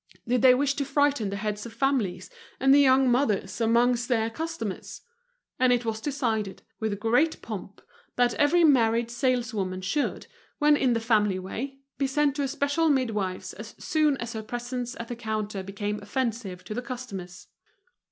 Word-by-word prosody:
Did 245 0 +2
they 255 -1 +7
wish 275 +1 +1
to 285 - +1
frighten 280 -5 +1
the 200 - -3
heads 210 +2 -3
of 225 - -11
families 225 -8 -1 0.3
and 270 +1 +5
the 285 - +7
young 265 -1 +5
mothers 215 -5 0
amongst 240 +1 +3
their 225 -3 +1
customers? 320 - -5 0.6
And 255 0 +4
it 245 -1 +2
was 220 -1 -2
decided, 225 -8 -2 0.2
with 215 -3 -2
great 245 +9 +2
pomp, 200 -2 -7 0.3
that 245 -1 +3
every 335 +4 +3
married 235 -5 +3
saleswoman 235 -7 -1
should, 240 +11 -1 0.3
when 295 0 +5
in 260 -4 +2
the 230 - +1
family 210 -4 +2
way, 265 +9 -6 0.2
be 275 - +2
sent 285 +1 +1
to - - 0
a 275 - 0
special 285 +3 +1
midwife's 210 -9 -1
as 215 +1 -10
soon 305 -3 +1
as 235 -1 -5
her 220 - -4
presence 245 +2 -5
at 230 - -5
the 240 - -5
counter 215 -3 -3
became 205 +2 -4
Offensive 215 -4 -3
to - - -6
the 245 - -3
customers. 200 -8 -7
235 Hz, 170 wpm, -27 LUFS, 210-270 Hz, 0.6 s, they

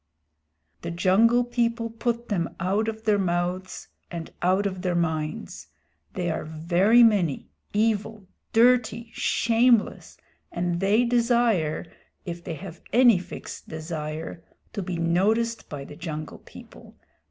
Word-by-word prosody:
"The - - -5
Jungle 205 +8 +3
People 235 -1 -1
put 235 +1 -2
them 175 -6 -1
out 195 +5 0
of 220 0 -4
their 210 -2 +2
mouths 180 0 -2 0.2
and 170 -2 -6
out 185 +3 +2
of 190 -2 -3
their 180 -2 -1
minds. 160 +4 -3 0.5
They 175 -2 -1
are - - -3
very 175 +9 +3
many, 195 - +2 0.2
evil, 215 -1 0 0.3
dirty, 230 -1 +3
shameless, 235 -1 +2 0.3
and 175 0 -1
they 205 +5 +3
desire, 235 -10 +2 0.4
if 170 -1 -6
they 165 - -5
have 175 +1 -10
any 240 -5 +6
fixed 180 - -9
desire, 160 0 -5 0.3
to 205 - -3
be 180 -1 -4
noticed 210 +8 +1
by 140 -2 -6
the 145 - -11
Jungle 155 -2 -6
People. - - -14
195 Hz, 130 wpm, -25 LUFS, 170-230 Hz, 0.5 s, any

